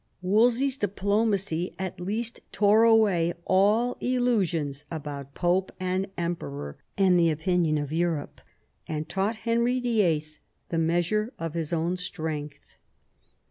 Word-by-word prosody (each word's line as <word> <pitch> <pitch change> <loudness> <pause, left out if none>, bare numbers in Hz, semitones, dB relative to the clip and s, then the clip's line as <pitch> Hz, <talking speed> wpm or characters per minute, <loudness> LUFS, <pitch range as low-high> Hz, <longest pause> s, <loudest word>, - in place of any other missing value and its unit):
Wolsey's 240 +7 +3
diplomacy 200 -3 0
at 190 -2 -5
least 220 +6 -2
tore 210 +1 +4
away 200 -7 +4
all 210 +6 +3
illusions 185 - 0
about 145 -3 -6
Pope 185 +2 +1
and 185 +1 -1
Emperor, 75 - -4 0.2
and 185 -2 +4
the 170 -1 +4
opinion 160 0 +1
of 145 0 -3
Europe, 165 -3 -1 0.5
and 155 0 -3
taught 195 +6 -1
Henry 235 +2 +2
YIII. 170 -11 0 0.3
the 165 - 0
measure 175 +7 +1
of 165 -2 -4
his 165 -2 -3
own 170 +2 0
strength. 155 -4 -5
180 Hz, 120 wpm, -27 LUFS, 160-215 Hz, 0.5 s, tore